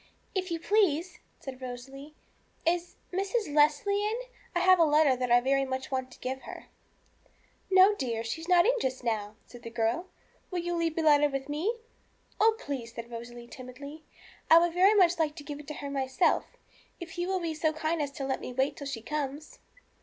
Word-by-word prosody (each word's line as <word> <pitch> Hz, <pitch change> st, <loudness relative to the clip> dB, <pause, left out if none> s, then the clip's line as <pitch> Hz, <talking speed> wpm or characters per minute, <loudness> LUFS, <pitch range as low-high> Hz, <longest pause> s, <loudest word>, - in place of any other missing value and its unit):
'If 370 Hz, -1 st, -2 dB
you 335 Hz, -1 st, -2 dB
please,' 360 Hz, -3 st, +1 dB, 0.2 s
said 265 Hz, -1 st, -9 dB
Rosalie, 270 Hz, +4 st, -8 dB, 0.5 s
'is 350 Hz, +1 st, 0 dB, 0.2 s
Mrs. 390 Hz, -2 st, -1 dB
Leslie 300 Hz, +7 st, +3 dB
in 425 Hz, +2 st, 0 dB
I -, -, -10 dB, 0.3 s
I -, -, +3 dB
have 370 Hz, 0 st, +6 dB
a -, -, +7 dB
letter 300 Hz, -3 st, +4 dB
that 250 Hz, 0 st, -2 dB
I 240 Hz, -, +6 dB
want 245 Hz, -, +4 dB
very 275 Hz, +1 st, +2 dB
much 260 Hz, 0 st, -4 dB
to 260 Hz, -1 st, -4 dB
give 265 Hz, +1 st, -4 dB
her.' -, -, -9 dB, 1.0 s
'No, 380 Hz, +2 st, +7 dB
dear; 235 Hz, -, -3 dB
she's 325 Hz, +9 st, -5 dB
not 355 Hz, -1 st, +5 dB
in 485 Hz, -, +5 dB
just 260 Hz, -1 st, -2 dB
now,' 215 Hz, -3 st, -2 dB
said 245 Hz, -, -13 dB
the 230 Hz, -, -7 dB
girl; 230 Hz, +9 st, -1 dB, 0.4 s
'will 365 Hz, -, -4 dB
you 350 Hz, 0 st, -2 dB
leave 335 Hz, -2 st, 0 dB
the 330 Hz, -, 0 dB
letter 295 Hz, -1 st, +5 dB
with 275 Hz, -1 st, -4 dB
me?' 320 Hz, +11 st, -1 dB, 0.6 s
'Oh, 445 Hz, +1 st, +4 dB
please,' 255 Hz, -, -6 dB
said 235 Hz, 0 st, -7 dB
Rosalie 235 Hz, +1 st, -8 dB
timidly, 275 Hz, +5 st, -10 dB, 0.5 s
'I 325 Hz, -, +9 dB
would 340 Hz, 0 st, +3 dB
very 380 Hz, +4 st, +5 dB
much 355 Hz, -3 st, +4 dB
like 305 Hz, -2 st, +1 dB
to 295 Hz, -, -9 dB
give 290 Hz, 0 st, -7 dB
it 295 Hz, -, -12 dB
to 300 Hz, -, -6 dB
her 280 Hz, -1 st, -6 dB
myself, 270 Hz, +4 st, +1 dB, 0.5 s
if 345 Hz, 0 st, -8 dB
you 350 Hz, -, -1 dB
will 380 Hz, 0 st, 0 dB
be 335 Hz, -2 st, -2 dB
so 310 Hz, 0 st, +1 dB
kind 315 Hz, +1 st, -1 dB
as 290 Hz, -, -1 dB
to 275 Hz, -, -4 dB
let 265 Hz, 0 st, -2 dB
me -, -, -6 dB
wait 265 Hz, +3 st, 0 dB
till 280 Hz, -, -6 dB
she 240 Hz, -5 st, -5 dB
comes.' 295 Hz, +1 st, -4 dB
295 Hz, 205 wpm, -29 LUFS, 260-345 Hz, 1.0 s, I